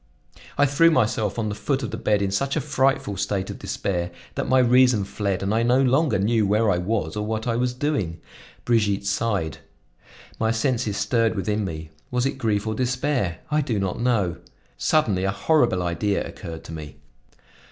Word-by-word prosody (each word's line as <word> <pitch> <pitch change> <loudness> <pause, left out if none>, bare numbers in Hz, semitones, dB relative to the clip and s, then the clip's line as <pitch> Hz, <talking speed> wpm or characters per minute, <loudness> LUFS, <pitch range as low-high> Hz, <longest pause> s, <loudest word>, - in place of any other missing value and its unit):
I 140 - +5
threw 145 +4 +4
myself 110 -7 +1
on 110 -2 -1
the - - -2
foot 135 +6 -2
of - - -4
the - - -3
bed 105 -2 +1
in 95 - -1
such 135 +8 0
a - - +2
frightful 135 -6 0
state 100 0 -2
of - - -9
despair, 90 -3 -2 0.2
that - - -3
my 130 - +4
reason 125 -3 +5
fled 100 -1 -2
and 100 +2 0
I 115 - +2
no 120 +2 +3
longer 135 +2 +3
knew 105 +2 +2
where 105 +1 +3
I 90 - +1
was 95 -3 -2
or 105 - -2
what 110 +1 -3
I 115 -2 0
was 125 +1 0
doing. 125 - -1 0.5
Brigitte 105 -4 +1
sighed. 100 -5 -1 0.8
My 110 - +1
senses 115 -2 0
stirred 115 +2 +1
within 105 +2 -1
me. 80 -3 -6 0.2
Was 125 0 0
it 135 0 -2
grief 105 -3 0
or 110 - -1
despair? 125 - -1
I 150 0 +3
do 120 -6 -1
not 95 +1 -2
know. 105 -8 +1 0.4
Suddenly 105 -12 +1
a 95 - +1
horrible 95 - +2
idea 90 +4 -1
occurred 85 -4 -8
to - - -10
me. 75 -2 -8
110 Hz, 190 wpm, -24 LUFS, 100-125 Hz, 0.8 s, I